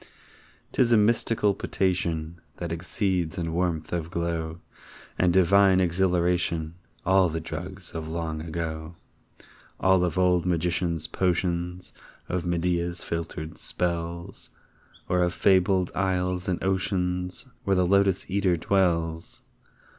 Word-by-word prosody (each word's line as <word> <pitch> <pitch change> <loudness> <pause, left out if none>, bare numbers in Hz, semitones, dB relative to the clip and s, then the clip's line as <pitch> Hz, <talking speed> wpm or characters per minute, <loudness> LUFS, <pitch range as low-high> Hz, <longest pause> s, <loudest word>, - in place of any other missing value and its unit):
'Tis 120 -2 +2
a 115 - +7
mystical 105 -1 +2
potation 85 -4 -1 0.2
That 85 -2 -4
exceeds 90 +1 -1
in 85 -2 -2
warmth 85 -3 -1
of 85 -2 -2
glow 85 -1 -3 0.6
And 90 -1 +4
divine 95 +1 +5
exhilaration 90 -2 +1 0.3
All 95 -1 +4
the 80 +1 -3
drugs 90 +3 -6
of 80 -1 -5
long 80 -1 -3
ago 80 0 -5 0.8
All 95 -1 +4
of 85 -2 -1
old 90 -2 +3
magicians' 85 -1 0
potions 90 0 -1 0.3
Of 90 -1 -2
Medea's 85 0 -1
filtered 80 -1 -5
spells 85 +1 -4 0.6
Or 90 0 +2
of 90 0 +1
fabled 95 -1 +3
isles 90 -1 0
and 90 - -1
oceans 90 0 -1 0.2
Where 100 - +2
the 90 -1 +3
Lotos 100 0 +3
eater 95 -2 +1
dwells! 85 -3 0
90 Hz, 115 wpm, -26 LUFS, 85-95 Hz, 0.8 s, a